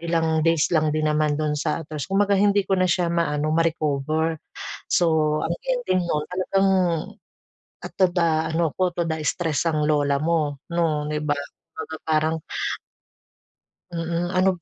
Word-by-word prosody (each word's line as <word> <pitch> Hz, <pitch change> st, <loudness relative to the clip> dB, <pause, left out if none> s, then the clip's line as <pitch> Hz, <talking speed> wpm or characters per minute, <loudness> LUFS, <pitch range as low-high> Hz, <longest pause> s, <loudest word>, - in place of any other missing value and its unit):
ilang 165 Hz, -1 st, +1 dB
days 165 Hz, +1 st, +2 dB
lang 155 Hz, -2 st, +3 dB
din 155 Hz, 0 st, +1 dB
naman 150 Hz, -1 st, +1 dB
dun 155 Hz, 0 st, 0 dB
sa 165 Hz, -, -1 dB
trash 150 Hz, -2 st, -6 dB
kumbaga 200 Hz, +1 st, +2 dB
hindi 205 Hz, -1 st, +3 dB
ko 195 Hz, -, -3 dB
na 185 Hz, -1 st, +3 dB
siya 175 Hz, -1 st, +1 dB
maano 155 Hz, -3 st, 0 dB
ma-recover, 160 Hz, -1 st, 0 dB, 0.5 s
so 155 Hz, -3 st, +2 dB
ang -, -, -1 dB
ending -, -, 0 dB
no'n 150 Hz, -2 st, 0 dB
talagang, 195 Hz, +1 st, +1 dB, 1.1 s
at -, -, -7 dB
toda 175 Hz, -2 st, +3 dB, 0.3 s
ano 165 Hz, 0 st, +2 dB
ko 185 Hz, -1 st, +1 dB
toda 165 Hz, -2 st, -1 dB
stress 160 Hz, -1 st, 0 dB
ang 155 Hz, -2 st, 0 dB
lola 145 Hz, -2 st, +2 dB
mo 155 Hz, -3 st, 0 dB, 0.2 s
'no, 160 Hz, -3 st, +1 dB
'di 150 Hz, -, -1 dB
ba, 145 Hz, -, +2 dB, 0.4 s
kumbaga 160 Hz, 0 st, -6 dB
parang 155 Hz, 0 st, +2 dB, 1.6 s
Mm, 170 Hz, 0 st, -2 dB
ano 185 Hz, +1 st, +3 dB
165 Hz, 150 wpm, -23 LUFS, 155-175 Hz, 1.6 s, lang